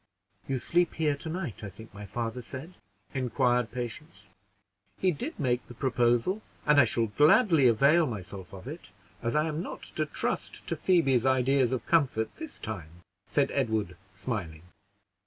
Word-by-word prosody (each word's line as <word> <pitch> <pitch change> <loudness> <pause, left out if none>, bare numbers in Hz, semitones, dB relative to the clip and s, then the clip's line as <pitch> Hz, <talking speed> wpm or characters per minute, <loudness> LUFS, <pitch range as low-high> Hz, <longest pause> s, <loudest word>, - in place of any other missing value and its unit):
"You 135 - 0
sleep 175 +7 +1
here 150 -3 +1
to 160 - -6
night, 160 - -4
I 105 - -4
think 110 +4 -13
my 105 0 -8
father 120 +2 -3
said?" 135 +8 -8 0.4
inquired 125 -2 +1
Patience. 120 -3 -7 0.7
"He 185 - +2
did 245 - -5
make 125 -4 0
the 120 - -11
proposal, 125 - +1 0.2
and 150 -1 +6
I - - +5
shall 115 +1 +1
gladly 150 - +5
avail 140 +8 +5
myself 100 -5 -7
of 95 +1 -10
it, 155 - -8 0.3
as 115 +3 -1
I 150 +1 +3
am 155 +1 -2
not - - -7
to - - +1
trust - - -3
to - - 0
Phoebe's 140 -10 +3
ideas 130 0 +3
of 125 -4 -2
comfort 135 -9 +1
this 320 -2 -7
time," 85 -5 -7 0.2
said - - +1
Edward, 110 -5 0 0.2
smiling. 90 -7 -4
125 Hz, 160 wpm, -29 LUFS, 110-150 Hz, 0.7 s, and